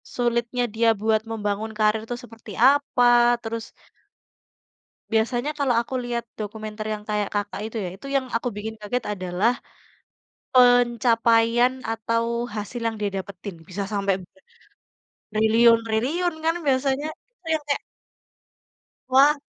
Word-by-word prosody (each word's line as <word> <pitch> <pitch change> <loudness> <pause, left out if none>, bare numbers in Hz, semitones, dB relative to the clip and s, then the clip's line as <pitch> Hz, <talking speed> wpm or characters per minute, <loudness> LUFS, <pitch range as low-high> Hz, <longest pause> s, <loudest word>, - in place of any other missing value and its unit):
sulitnya 240 0 0
dia 230 +1 +4
buat 220 0 +2
membangun 210 0 -2
karir 215 0 +2
itu 245 - -3
seperti 225 -2 -12 0.2
apa, 245 -4 +4
terus 225 0 -5 1.4
Biasanya 240 +5 +1
kalau 265 -4 +2
aku 240 - -9
lihat 240 -1 -2 0.2
dokumenter 215 0 -5
yang 210 -1 -6
kayak 210 -1 0
Kakak 205 -1 -2
itu 225 +1 -5
ya, - - -3
itu 210 - -11
yang 270 -1 +2
aku 230 +2 0
bikin 220 +2 -5
kaget 240 +4 -2
adalah, 185 +4 0 1.0
pencapaian 240 -1 +4 0.2
atau, 230 +1 0 0.3
hasil 215 +3 -5
yang 225 - -2
dia 205 - +1
dapetin, 190 0 -7
bisa 195 +2 -3
sampai 200 -1 +1
be 180 - -18 1.0
triliun-triliun 230 +9 +3
kan 325 +1 +3
biasanya, 270 +1 +1 0.3
itu 475 -8 -27
yang 310 - -1
kayak 285 - 0 1.3
Wah. 275 +3 +6
230 Hz, 125 wpm, -24 LUFS, 215-245 Hz, 1.4 s, Wah